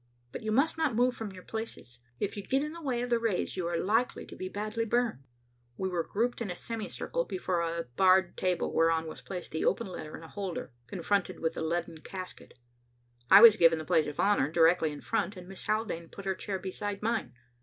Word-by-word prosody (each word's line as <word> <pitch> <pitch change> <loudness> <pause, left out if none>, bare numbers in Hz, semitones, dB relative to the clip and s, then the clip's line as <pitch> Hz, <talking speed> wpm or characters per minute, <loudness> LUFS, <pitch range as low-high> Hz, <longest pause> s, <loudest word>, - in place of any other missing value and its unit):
But - - -6
you 220 - -2
must 285 +8 +2
not 300 -8 +1
move 245 +2 +3
from 220 -3 -5
your 185 -1 -11
places. 220 - -7 0.2
If 205 - -2
you 205 - -4
get 270 +7 0
in 300 +1 -4
the 335 - -9
way 250 -5 -1
of 245 - -4
the 235 - +4
rays, 225 -6 -1
you 180 -2 -2
are 170 0 -1
likely 225 +7 +1
to - - -11
be 185 - -5
badly 215 +3 -2
burned." 230 - 0 0.5
We 190 - -1
were 175 -2 0
grouped 235 +7 -1
in 220 - -2
a 180 - -3
semi 225 +3 -5
circle - - -2
before 185 - -1
a 170 0 -1
bared 185 +8 +3
table 180 -2 0
whereon 165 0 +3
was 160 - -8
placed 180 -3 -7
the 160 - -2
open 235 - +1
letter 155 -5 -7
in - - -12
a - - -9
holder, 190 -5 -5 0.2
confronted 195 +2 -1
with 160 - 0
the - - -5
leaden 165 0 -2
casket. 185 -4 -9 0.7
I 200 - +10
was 225 -2 +10
given 165 -3 +6
the 155 - -5
place 155 - +3
of 150 - -6
honor, 200 -9 +3
directly 165 0 +4
in 145 - -8
front, 215 -3 -1
and 180 0 -10
Miss 195 0 -9
Haldane 215 -7 -1
put 200 - -10
her 190 - +1
chair 195 +1 -4
beside 200 +2 -5
mine. 220 - -1
190 Hz, 230 wpm, -30 LUFS, 170-225 Hz, 0.7 s, I